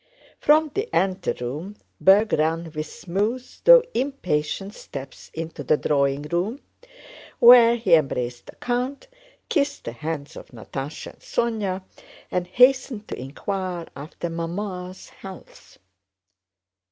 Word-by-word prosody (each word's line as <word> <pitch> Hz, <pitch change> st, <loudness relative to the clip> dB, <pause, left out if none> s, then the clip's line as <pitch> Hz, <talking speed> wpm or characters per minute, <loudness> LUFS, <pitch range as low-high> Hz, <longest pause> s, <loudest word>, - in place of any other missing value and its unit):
From 305 Hz, 0 st, +4 dB
the 415 Hz, +4 st, -2 dB
anteroom 185 Hz, -2 st, -2 dB, 0.2 s
Berg 205 Hz, +3 st, +5 dB
ran 165 Hz, +2 st, 0 dB
with 155 Hz, 0 st, -4 dB
smooth 210 Hz, +11 st, -2 dB, 0.2 s
though -, -, +9 dB
impatient 195 Hz, -, -2 dB
steps 135 Hz, -8 st, -9 dB
into 160 Hz, -2 st, -6 dB
the 150 Hz, +3 st, +3 dB
drawing 140 Hz, -1 st, +1 dB
room, 175 Hz, -, -2 dB, 0.8 s
where 235 Hz, -1 st, +8 dB
he 225 Hz, -7 st, +1 dB
embraced 125 Hz, -6 st, +1 dB
the -, -, -12 dB
count, 250 Hz, -, -3 dB, 0.4 s
kissed 285 Hz, -3 st, 0 dB
the -, -, -5 dB
hands 150 Hz, +3 st, -5 dB
of -, -, -10 dB
Natásha 135 Hz, +5 st, -7 dB
and -, -, -27 dB
Sónya, 205 Hz, -5 st, -2 dB, 0.5 s
and 180 Hz, -1 st, -1 dB
hastened 250 Hz, 0 st, +3 dB
to -, -, -4 dB
inquire 175 Hz, +6 st, -4 dB
after 150 Hz, +4 st, -6 dB
"Mamma's" 180 Hz, +2 st, -5 dB
health. 190 Hz, -2 st, -13 dB
185 Hz, 115 wpm, -24 LUFS, 155-235 Hz, 0.8 s, though